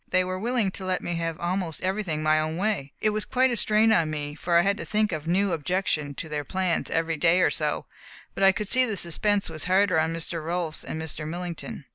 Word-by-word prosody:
They 185 Hz, 0 st, +3 dB
were 185 Hz, 0 st, -3 dB
willing 230 Hz, -2 st, 0 dB
to 190 Hz, -, -7 dB
let 185 Hz, -1 st, -1 dB
me 175 Hz, -, -2 dB
have 165 Hz, -1 st, -3 dB
almost 175 Hz, -2 st, -2 dB
everything 185 Hz, -5 st, -1 dB
my 155 Hz, 0 st, +4 dB
own 155 Hz, +1 st, -2 dB
way. 190 Hz, -8 st, -1 dB
It 215 Hz, -, +3 dB
was 215 Hz, 0 st, -1 dB
quite 255 Hz, +6 st, +2 dB
a -, -, 0 dB
strain 220 Hz, 0 st, +3 dB
on 165 Hz, -5 st, +3 dB
me, 145 Hz, -1 st, -3 dB
for 170 Hz, +3 st, +1 dB
I 170 Hz, -, +5 dB
had 200 Hz, +1 st, +2 dB
to -, -, -5 dB
think 215 Hz, -1 st, 0 dB
of 155 Hz, -1 st, -4 dB
a -, -, -1 dB
new 195 Hz, +2 st, +2 dB
objection 160 Hz, -3 st, -1 dB
to 160 Hz, -, -6 dB
their 150 Hz, -1 st, -3 dB
plans 185 Hz, +3 st, -1 dB
every 165 Hz, 0 st, 0 dB
day 170 Hz, +3 st, +4 dB
or -, -, +4 dB
so, -, -, -1 dB, 0.5 s
but -, -, -2 dB
I 195 Hz, -, +8 dB
could 205 Hz, +2 st, -4 dB
see 255 Hz, +5 st, +4 dB
the 220 Hz, -5 st, -1 dB
suspense 200 Hz, +4 st, +1 dB
was 155 Hz, -2 st, -6 dB
harder 185 Hz, -2 st, +3 dB
on 160 Hz, +1 st, +1 dB
Mr. 165 Hz, 0 st, -4 dB
Rolfs 165 Hz, -1 st, -2 dB
and 160 Hz, -, -5 dB
Mr. 160 Hz, -1 st, -5 dB
Millington. 170 Hz, -2 st, -6 dB
175 Hz, 245 wpm, -26 LUFS, 160-195 Hz, 0.5 s, I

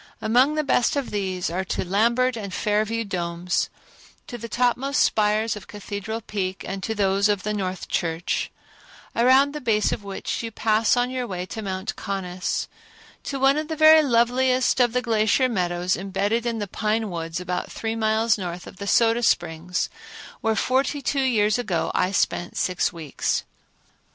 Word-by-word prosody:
Among 250 Hz, +7 st, +3 dB
the 305 Hz, -, +1 dB
best 250 Hz, -3 st, +2 dB
of 280 Hz, -3 st, -2 dB
these 185 Hz, -4 st, -2 dB
are 185 Hz, +2 st, -1 dB
to 185 Hz, -, -2 dB
Lambert 235 Hz, +7 st, +2 dB
and 205 Hz, -4 st, -6 dB
Fair 210 Hz, +3 st, +1 dB
View 230 Hz, +1 st, -2 dB
Domes; 175 Hz, -2 st, -2 dB, 0.6 s
to -, -, -8 dB
the 230 Hz, +1 st, -7 dB
topmost 250 Hz, +4 st, +1 dB
spires 215 Hz, +1 st, +2 dB
of 210 Hz, -, -10 dB
Cathedral 205 Hz, +2 st, -5 dB
Peak, 190 Hz, -3 st, -4 dB
and 195 Hz, 0 st, -4 dB
to 220 Hz, +3 st, -3 dB
those 200 Hz, 0 st, +2 dB
of 205 Hz, -2 st, 0 dB
the 210 Hz, -, -1 dB
North 190 Hz, -3 st, -3 dB
Church, 165 Hz, +1 st, -1 dB, 0.7 s
around 260 Hz, +4 st, +5 dB
the 300 Hz, -, -5 dB
base 215 Hz, -4 st, +2 dB
of -, -, -3 dB
which 200 Hz, -1 st, -4 dB
you 230 Hz, -, -4 dB
pass 220 Hz, +1 st, +2 dB
on 245 Hz, +1 st, +1 dB
your 255 Hz, -1 st, -3 dB
way 180 Hz, -3 st, -4 dB
to 220 Hz, -, -6 dB
Mount 190 Hz, -1 st, -4 dB
Conness; 185 Hz, -3 st, -3 dB, 0.6 s
to 275 Hz, -, -3 dB
one 270 Hz, +2 st, +4 dB
of 310 Hz, -, -4 dB
the 320 Hz, -, -3 dB
very 315 Hz, 0 st, +8 dB
loveliest 255 Hz, 0 st, +2 dB
of 240 Hz, -2 st, +3 dB
the 250 Hz, 0 st, 0 dB
glacier 225 Hz, +2 st, +2 dB
meadows 180 Hz, -4 st, 0 dB
imbedded 205 Hz, +5 st, -1 dB
in 230 Hz, -1 st, -1 dB
the 205 Hz, -2 st, -3 dB
pine 215 Hz, +1 st, -1 dB
woods 165 Hz, 0 st, -4 dB
about 180 Hz, 0 st, -3 dB
three 225 Hz, 0 st, -3 dB
miles 220 Hz, 0 st, +2 dB
north 175 Hz, -1 st, -5 dB
of -, -, -12 dB
the 200 Hz, -, -6 dB
Soda 230 Hz, +2 st, +3 dB
Springs, 175 Hz, -4 st, 0 dB, 0.5 s
where 225 Hz, 0 st, 0 dB
forty 270 Hz, +4 st, 0 dB
two 275 Hz, +3 st, 0 dB
years 215 Hz, -4 st, +2 dB
ago 200 Hz, -8 st, -1 dB
I 185 Hz, -, +1 dB
spent 175 Hz, -2 st, -1 dB
six 185 Hz, -1 st, 0 dB
weeks. 160 Hz, -5 st, -2 dB
215 Hz, 175 wpm, -24 LUFS, 190-240 Hz, 0.7 s, very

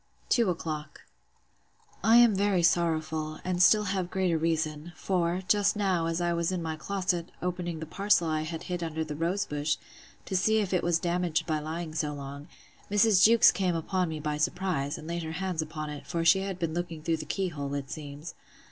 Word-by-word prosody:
Two 235 Hz, -5 st, +3 dB
o'clock. 155 Hz, -3 st, -4 dB, 1.0 s
I 225 Hz, +1 st, +5 dB
am 240 Hz, -2 st, +7 dB
very 195 Hz, -2 st, +2 dB
sorrowful, 160 Hz, -2 st, +1 dB
and 180 Hz, -1 st, 0 dB
still 210 Hz, +3 st, +6 dB
have 190 Hz, -3 st, -2 dB
greater 185 Hz, -3 st, +1 dB
reason; 160 Hz, 0 st, -1 dB
for, 180 Hz, +1 st, -1 dB
just 205 Hz, +1 st, +3 dB
now, 190 Hz, -5 st, +1 dB
as 165 Hz, 0 st, -1 dB
I 175 Hz, 0 st, +1 dB
was 170 Hz, +1 st, 0 dB
in 185 Hz, -, -1 dB
my 160 Hz, -1 st, -3 dB
closet, 180 Hz, 0 st, -2 dB
opening 175 Hz, -2 st, -3 dB
the 160 Hz, -, -5 dB
parcel 195 Hz, 0 st, +2 dB
I 155 Hz, -1 st, 0 dB
had 160 Hz, +1 st, -5 dB
hid 180 Hz, -1 st, -4 dB
under 160 Hz, -1 st, -2 dB
the 155 Hz, -1 st, -6 dB
rose 175 Hz, +6 st, 0 dB
bush, 150 Hz, +1 st, -1 dB, 0.5 s
to 190 Hz, -, -3 dB
see 220 Hz, +4 st, +3 dB
if 200 Hz, -3 st, 0 dB
it 180 Hz, -, +2 dB
was 170 Hz, -1 st, +2 dB
damaged 175 Hz, -2 st, 0 dB
by 155 Hz, -3 st, 0 dB
lying 160 Hz, +1 st, -5 dB
so 150 Hz, -1 st, -2 dB
long, 140 Hz, +1 st, -8 dB, 0.4 s
Mrs. 205 Hz, -1 st, +4 dB
Jewkes 230 Hz, +1 st, +7 dB
came 185 Hz, -2 st, 0 dB
upon 180 Hz, +2 st, -1 dB
me 155 Hz, -1 st, -4 dB
by 150 Hz, 0 st, -2 dB
surprise, 155 Hz, -2 st, -1 dB
and 155 Hz, -, -10 dB
laid 170 Hz, 0 st, -3 dB
her 160 Hz, -1 st, -5 dB
hands 180 Hz, -1 st, -2 dB
upon 155 Hz, -1 st, -5 dB
it; 145 Hz, -1 st, -9 dB
for 165 Hz, -1 st, -2 dB
she 190 Hz, +3 st, +6 dB
had 195 Hz, -1 st, -4 dB
been 165 Hz, -3 st, -2 dB
looking 170 Hz, -2 st, -4 dB
through 165 Hz, 0 st, 0 dB
the 155 Hz, -, -7 dB
key 190 Hz, +4 st, -1 dB
hole, 140 Hz, -3 st, -4 dB
it 140 Hz, -1 st, -5 dB
seems. 145 Hz, +2 st, -7 dB
170 Hz, 205 wpm, -28 LUFS, 155-185 Hz, 1.0 s, am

